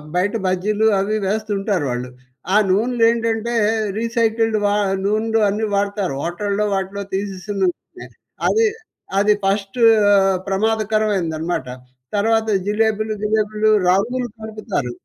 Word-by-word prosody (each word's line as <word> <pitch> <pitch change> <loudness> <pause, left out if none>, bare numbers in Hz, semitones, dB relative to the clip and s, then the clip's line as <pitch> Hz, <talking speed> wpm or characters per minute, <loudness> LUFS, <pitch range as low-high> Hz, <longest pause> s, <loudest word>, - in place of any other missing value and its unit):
బయట 185 +3 +1
బజ్జీలు 205 +4 +1
అవి 205 +2 -1
వేస్తుంటారు 200 -4 -1
వాళ్ళు. 125 +1 -4 0.4
ఆ - - +4
నూనెలేంటంటే 230 +2 +1 0.4
రీసైకిల్డ్ 225 -1 +1
వ - - +4 0.4
నూనెలు 220 +2 +1
అన్నీ 215 +2 -1
వాడుతారు. 200 -3 -1
హోటల్లో 200 +4 -1
వాటిలో 195 +1 -3
తీసేసినవున్నాయి. 195 -1 -4 0.4
అది 450 0 +3 0.5
అది 210 +1 +4
ఫస్టూ 195 +4 -1 0.7
ప్రమాదకరమైనదనమాట. 200 -6 0 0.5
తర్వాత 225 +2 +1 0.2
జిలేబులు, 215 +1 0
గీలేబులు 215 0 +1 0.2
రంగులు 240 +7 +1
కలుపుతారు. 215 - -4
210 Hz, 95 wpm, -20 LUFS, 195-220 Hz, 0.7 s, ఆ